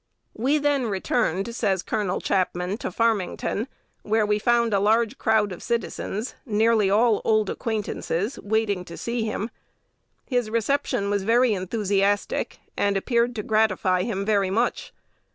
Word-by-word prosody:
"We 265 Hz, +7 st, +1 dB
then 285 Hz, -4 st, +1 dB
returned," 195 Hz, +1 st, -1 dB
says 195 Hz, -6 st, 0 dB
Col. 205 Hz, -4 st, -1 dB
Chapman, 185 Hz, +1 st, -1 dB
"to -, -, -3 dB
Farmington, 220 Hz, +1 st, 0 dB, 0.3 s
where 215 Hz, 0 st, +1 dB
we 210 Hz, 0 st, +1 dB
found 235 Hz, 0 st, +2 dB
a 200 Hz, -, +3 dB
large 225 Hz, +5 st, +2 dB
crowd 220 Hz, -3 st, +2 dB
of 180 Hz, -, -7 dB
citizens 230 Hz, -1 st, -3 dB
nearly 220 Hz, -2 st, +2 dB
all 220 Hz, +2 st, +3 dB
old 215 Hz, -2 st, +2 dB
acquaintances 215 Hz, -2 st, -3 dB
waiting 205 Hz, -3 st, 0 dB
to 170 Hz, -, -9 dB
see 235 Hz, 0 st, -2 dB
him. 220 Hz, +1 st, -3 dB, 0.7 s
His 245 Hz, -4 st, 0 dB
reception 230 Hz, -2 st, 0 dB
was 205 Hz, -1 st, +1 dB
very 230 Hz, +3 st, +3 dB
enthusiastic, 200 Hz, +1 st, 0 dB, 0.2 s
and 200 Hz, -1 st, +1 dB
appeared 235 Hz, +3 st, +1 dB
to 210 Hz, -, -3 dB
gratify 195 Hz, -4 st, +2 dB
him 200 Hz, -1 st, -2 dB
very 200 Hz, -3 st, +2 dB
much. 230 Hz, +5 st, -1 dB
215 Hz, 140 wpm, -24 LUFS, 200-230 Hz, 0.7 s, a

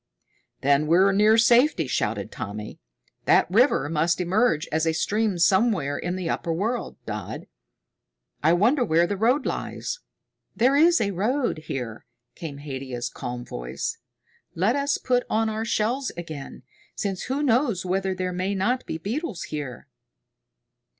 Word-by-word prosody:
"Then 140 Hz, +2 st, +3 dB
we're 185 Hz, +5 st, +5 dB
near 210 Hz, +3 st, +5 dB
safety," 235 Hz, -, +4 dB
shouted 130 Hz, -, -2 dB
Tommy. 105 Hz, 0 st, -6 dB, 0.5 s
"That -, -, +5 dB
river 235 Hz, -, +4 dB
must 165 Hz, +3 st, +1 dB
emerge 180 Hz, -2 st, +1 dB
as 160 Hz, +1 st, +1 dB
a 160 Hz, -, +2 dB
stream 210 Hz, +2 st, 0 dB
somewhere 190 Hz, -5 st, +3 dB
in 175 Hz, +1 st, -3 dB
the 185 Hz, -2 st, -3 dB
upper 165 Hz, -, -2 dB
world, 220 Hz, +9 st, -2 dB
Dodd. 105 Hz, -4 st, -5 dB, 1.0 s
I 160 Hz, +3 st, +4 dB
wonder 240 Hz, +10 st, +3 dB
where 170 Hz, -5 st, +3 dB
the 200 Hz, -, -2 dB
road 245 Hz, +8 st, +2 dB
lies." -, -, -3 dB, 0.6 s
"There 255 Hz, +4 st, +3 dB
is 335 Hz, +3 st, +5 dB
a 200 Hz, -2 st, 0 dB
road 230 Hz, -, 0 dB
here," 120 Hz, -5 st, -5 dB, 0.3 s
came 150 Hz, -4 st, -7 dB
Haidia's 130 Hz, -4 st, -5 dB
calm 125 Hz, -1 st, -6 dB
voice. -, -, -5 dB, 0.6 s
"Let 195 Hz, +9 st, +2 dB
us 285 Hz, 0 st, +1 dB
put 250 Hz, -1 st, +1 dB
on 220 Hz, 0 st, +1 dB
our 220 Hz, +1 st, -3 dB
shells 240 Hz, +5 st, 0 dB
again, 155 Hz, -6 st, -7 dB, 0.3 s
since 195 Hz, -2 st, -3 dB
who 275 Hz, +3 st, -1 dB
knows 235 Hz, -7 st, +2 dB
whether 190 Hz, +1 st, 0 dB
there 185 Hz, 0 st, -2 dB
may 185 Hz, +3 st, -1 dB
not 245 Hz, +7 st, 0 dB
be -, -, -3 dB
beetles 220 Hz, -, -4 dB
here." 140 Hz, -5 st, -5 dB
190 Hz, 145 wpm, -25 LUFS, 155-235 Hz, 1.0 s, we're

